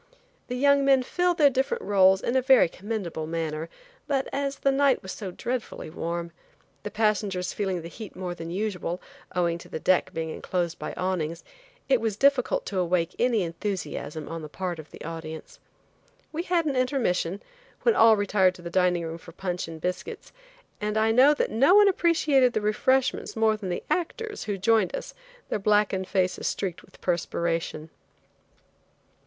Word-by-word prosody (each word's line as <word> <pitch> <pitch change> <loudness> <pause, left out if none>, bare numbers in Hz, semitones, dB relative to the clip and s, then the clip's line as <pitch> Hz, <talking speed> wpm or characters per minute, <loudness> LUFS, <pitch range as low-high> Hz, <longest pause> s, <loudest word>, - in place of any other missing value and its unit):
The 250 - -3
young 280 +2 +4
men 270 -2 +4
filled 355 +5 0
their 290 -3 +6
different 270 - -1
roles 190 -1 +4
in 240 - -1
a 260 - +4
very 260 -6 +6
commendable 185 -4 -5
manner, 160 -1 -3 0.4
but 275 -2 0
as 280 0 -1
the 275 - +1
night 275 -1 +3
was 190 - -6
so 195 - -6
dreadfully 235 -4 -4
warm, 170 0 -4 0.5
the - - -5
passengers 205 -4 0
feeling 190 -4 -2
the - - -6
heat 215 +4 -9
more 180 -1 -4
than 165 -1 -7
usual, 180 -2 -3 0.4
owing 170 -1 +1
to - - -13
the - - -4
deck 185 +2 +2
being 160 0 -3
enclosed 175 0 -3
by - - -5
awnings, 170 -3 -2 0.4
it 265 -3 +3
was 220 -3 -1
difficult 275 -1 +2
to 195 - -2
awake 175 -1 +1
any 235 -5 +2
enthusiasm 165 -3 -4
on 165 0 -5
the 155 - -8
part 180 0 -4
of 155 - -10
the - - -11
audience. 160 -1 -7 0.7
We 320 - -2
had 345 -2 +1
an 285 -3 0
intermission, 230 -9 0 0.4
when 470 - +5
all 225 -1 +7
retired 195 -2 +2
to 175 - -13
the 170 - -6
dining 180 -1 +2
room 165 +1 -6
for 165 - -13
punch 180 -1 -3
and 165 -1 -8
biscuits, 180 +3 -5 0.5
and 210 +1 -1
I 220 +1 +3
know 265 +6 +6
that - - -1
no 275 - +5
one 415 0 +7
appreciated 305 -9 +3
the 215 - 0
refreshments 255 +5 +1
more 220 -1 +3
than 205 -3 -6
the 175 - -3
actors, 420 +5 -2
who 205 -2 -2
joined 210 -1 +2
us, - - -7 0.4
their - - -1
blackened 205 -2 +2
faces 185 -2 0
streaked 185 -4 -3
with - - -20
perspiration. 165 -2 -2
195 Hz, 175 wpm, -26 LUFS, 170-255 Hz, 0.7 s, all